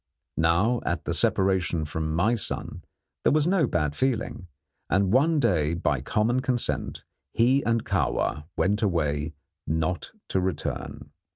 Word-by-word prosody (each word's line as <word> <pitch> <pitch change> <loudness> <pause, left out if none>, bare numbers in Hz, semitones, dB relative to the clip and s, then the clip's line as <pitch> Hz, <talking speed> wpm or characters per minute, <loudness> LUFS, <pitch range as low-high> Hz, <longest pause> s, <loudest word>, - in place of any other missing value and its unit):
Now, 85 +9 +2
at 85 -2 -2
the - - -1
separation 95 -4 +1
from 80 +1 -3
my 100 +8 +3
son, 115 - -3 0.4
there - - +3
was 150 0 +3
no 175 -5 +3
bad 75 -7 -1
feeling, 115 - -1 0.4
and 95 +2 +2
one 150 +5 +4
day 85 - +2
by 75 -6 0
common 110 - +1
consent 125 -2 -2 0.3
he 125 +5 +4
and 115 -1 +1
Kahwa 75 +2 0
went 105 +3 +1
away 80 -5 0 0.3
not 80 +3 -1 0.2
to 95 - +1
return. 90 -5 -4
95 Hz, 135 wpm, -26 LUFS, 80-120 Hz, 0.4 s, one